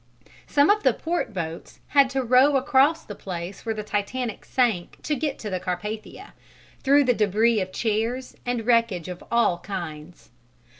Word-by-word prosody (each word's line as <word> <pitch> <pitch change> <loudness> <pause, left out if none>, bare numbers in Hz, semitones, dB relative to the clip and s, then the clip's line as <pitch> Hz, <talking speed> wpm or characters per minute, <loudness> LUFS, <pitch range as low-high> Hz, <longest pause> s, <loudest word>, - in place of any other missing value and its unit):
Some 290 +5 +4
of 420 +1 +2
the - - +3
port 340 -6 -2
boats 165 -4 -6
had 280 -2 +5
to 265 0 -1
row 255 +4 +5
across 280 +4 +3
the 205 - -8
place 180 -1 -7
where 225 - 0
the 215 - -4
Titanic 215 +3 -3
sank 225 -9 0
to 305 - -1
get 290 0 -2
to 215 - -6
the 185 - -1
Carpathia, 210 +4 -5 0.5
through 280 +1 +5
the 250 -2 +3
debris 215 +1 +2
of 185 0 -4
chairs 230 +5 -2
and 245 -2 -2
wreckage 230 -8 +2
of 180 -1 -7
all 235 -7 +2
kinds. 170 - -7
225 Hz, 165 wpm, -24 LUFS, 190-260 Hz, 0.5 s, had